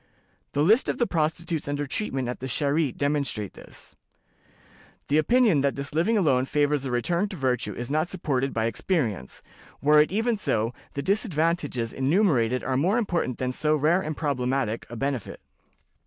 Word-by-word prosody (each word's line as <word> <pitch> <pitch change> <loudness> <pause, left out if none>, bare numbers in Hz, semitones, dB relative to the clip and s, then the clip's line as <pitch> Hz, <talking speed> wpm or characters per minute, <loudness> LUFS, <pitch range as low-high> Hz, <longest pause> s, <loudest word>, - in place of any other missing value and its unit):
The 145 - +2
lists 220 - +4
of - - -1
the 240 - +2
prostitutes 165 -2 -1
under 145 0 -2
treatment 135 - -2
at 125 - -4
the 130 - -5
Charité 140 +1 0
demonstrate 140 -8 -1
this. - - -12 1.1
The 150 +2 +4
opinion 215 - +3
that 140 0 +1
this 140 +1 -4
living 185 +9 +2
alone 135 -9 +2
favors 145 0 +1
a - - -2
return 170 - 0
to 195 - -6
virtue 130 -5 -1
is 120 +2 -5
not 155 +3 +1
supported 135 -7 -1
by 110 -1 -1
experience; 115 - -2 0.4
were 150 +1 +5
it 150 - +1
even 225 +2 0
so, 115 - 0 0.2
the 140 - -2
disadvantages 165 - 0
enumerated 135 - +2
are 130 -1 0
more 185 - +2
important 175 - -1
than 125 -1 -1
so 150 +4 +1
rare 155 +5 +2
and 155 -4 -4
problematical 130 -6 -1
a - - -6
benefit. 135 -3 -3
145 Hz, 170 wpm, -26 LUFS, 130-170 Hz, 1.1 s, were